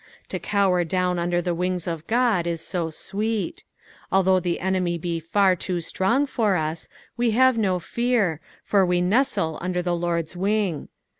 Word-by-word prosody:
To - - -3
cower 195 -3 +2
down 180 +1 0
under 175 0 0
the 175 - 0
wings 180 0 -2
of 165 -3 -4
Ood 230 -8 +2
is 170 -1 -2
so 170 0 -3
sweet. 215 - -3 0.5
Although 190 -1 +4
the 175 -1 -2
enemy 180 -2 0
be 170 0 -3
far 185 +3 +2
too 180 0 -2
strong 190 - +1
for 220 -7 +1
us, 155 0 -3 0.3
we 240 0 +2
have 260 -2 +5
no 190 -4 +1
fear, 210 -3 0 0.2
for 200 -2 +3
we 180 -1 +2
nestle 180 - +1
under 180 0 -1
the 175 -1 0
Lord's 170 -1 -2
wing. 195 -3 0
180 Hz, 165 wpm, -24 LUFS, 170-205 Hz, 0.5 s, have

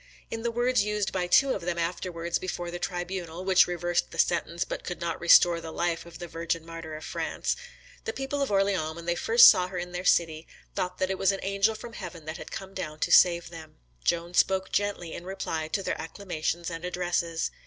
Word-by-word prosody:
In 225 - -3
the 235 - 0
words 240 -1 +2
used 210 -1 -1
by 180 -1 -1
two 270 +9 +5
of - - -4
them 170 0 -2
afterwards 170 0 -2
before 175 -2 -4
the 175 - -5
tribunal, 175 -1 -4
which 190 -1 +5
reversed 175 0 -1
the - - -10
sentence, 170 0 +1
but - - -6
could 175 - -5
not 170 -1 -3
restore 170 0 +6
the 165 - -7
life 170 0 -2
of 170 -1 -11
the 175 - -7
Virgin 165 0 -3
martyr 165 -1 -7
of 155 - -8
France, - - -2 0.5
"the 460 - -1
people 280 -5 -3
of 275 - 0
Orleans, 195 -5 +1
when 170 0 -9
they 175 - +1
first 465 - +7
saw 180 0 +6
her 185 0 -6
in 175 0 -4
their 180 +1 -4
city, 165 -3 +2 0.3
thought 180 0 -2
that 185 0 0
it 190 - -3
was 195 - +4
an 195 - -5
angel 200 +3 +1
from 235 +2 -9
heaven 170 -6 -8
that 155 +1 -5
had - - -9
come 195 0 -7
down 155 -5 -5
to - - -1
save 170 -1 +5
them." 160 -2 -11 0.3
Joan 170 +1 0
spoke 190 +1 +2
gently 200 -5 -1
in - - -7
reply 175 -4 -3
to 195 +5 -2
their - - -2
acclamations 170 -1 -3
and 165 0 -6
addresses. 175 -2 -1
175 Hz, 220 wpm, -28 LUFS, 170-195 Hz, 0.5 s, first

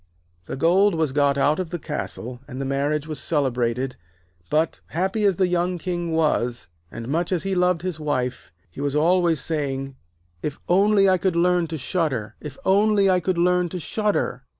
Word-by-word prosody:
The - - -4
gold 180 +7 +3
was 160 -4 0
got 140 0 +2
out 150 +3 +2
of 185 -3 -3
the 175 - -3
castle, 130 -5 -5
and 130 -2 -7
the 135 - -2
marriage 140 +2 0
was 155 -1 -3
celebrated, 125 -3 0 0.5
but, 155 +2 0
happy 190 +5 -1
as 195 -2 +3
the 185 - +2
young 180 0 0
King 175 -1 -3
was, 150 -7 0 0.2
and 115 0 -7
much 165 +6 -1
as 180 -3 0
he 195 0 -1
loved 180 -2 +2
his 180 -4 -3
wife, 130 - -2 0.2
he 135 - -8
was 145 0 -1
always 170 0 +3
saying: 135 -3 -2
'Oh, - - -17 0.5
if 150 - -6
only 195 +2 +4
I 185 -1 +3
could 185 -1 0
learn 175 0 +2
to 160 0 -4
shudder, 140 - -2
if - - -8
only 200 0 +4
I 185 - +3
could 180 0 -1
learn 180 0 +2
to 180 - -5
shudder.' 210 +5 -1
165 Hz, 190 wpm, -23 LUFS, 140-180 Hz, 0.5 s, only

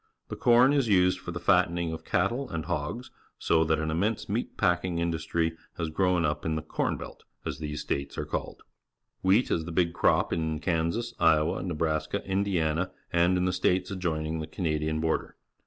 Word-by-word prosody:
The - - -4
corn 125 -1 +5
is 140 -4 +2
used 90 -2 +3
for - - -9
the - - -4
fattening 85 -1 +2
of 80 - -7
cattle 135 +4 0
and 80 -1 -4
hogs, 90 +9 -3 0.3
so 80 -1 +3
that 80 0 +2
an 80 +1 -2
immense 100 +7 -1
meat - - -3
packing 90 0 +1
industry 80 0 -1 0.2
has 80 -2 -2
grown 90 0 +2
up 75 0 -1
in 80 -1 -1
the 80 - -3
"corn 80 - -1
belt," - - -10 0.2
as - - -4
these 75 -1 -4
states 70 0 -3
are - - -2
called. - - -5 0.6
Wheat 100 +7 +3
is 80 - 0
the 85 - -6
big 85 0 +1
crop - - +2
in 80 -1 -1
Kansas, 90 +8 -1
Iowa, 80 -1 +3
Nebraska, 80 +1 -2
Indiana, 95 -4 0 0.2
and 85 +2 +3
in 90 - +1
the 90 - +1
states 90 +1 +1
adjoining 80 -4 -2
the 80 - -4
Canadian 80 -2 -1
border. 80 0 -1
85 Hz, 185 wpm, -28 LUFS, 80-95 Hz, 0.6 s, corn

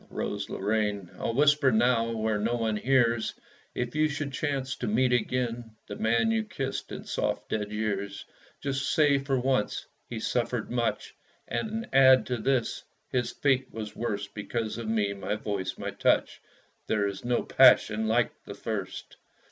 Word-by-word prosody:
Rose 100 -1 -3
Lorraine, 105 -2 -1
I'll 115 - -2
whisper 145 -1 +4
now, 115 0 +3
where 110 -2 -1
no 115 +3 0
one 110 -2 0
hears 120 -1 +2 0.4
If 120 -1 -2
you 155 0 +2
should 145 -1 -4
chance 135 -2 -2
to 125 - -3
meet 125 +4 +2
again 120 -1 -1
The - - -7
man 115 - +2
you 225 0 +1
kissed 150 -10 -4
in - - -6
soft, - - -2
dead 105 -1 -2
years, 100 -2 -3 0.4
Just 140 -1 -1
say 145 -3 +4
for 135 -1 0
once 130 -4 0 0.2
"He 115 - -4
suffered 120 0 -1
much," 120 -2 -1 0.3
And 215 - -3
add 130 -1 +7
to 125 - -2
this 125 +1 0 0.3
"His 125 -2 0
fate 135 -2 +1
was 110 -1 -6
worst 105 -3 -3
Because 110 +2 -3
of 115 - -5
me, 105 -2 +1
my 100 +1 -3
voice, 100 -3 -3
my - - -4
touch." - - +1 0.5
There 105 -2 +1
is 100 -1 -5
no 120 0 +1
passion 110 +1 +5
like 115 +1 +2
the - - -8
first! - - -5
120 Hz, 165 wpm, -28 LUFS, 110-130 Hz, 0.5 s, add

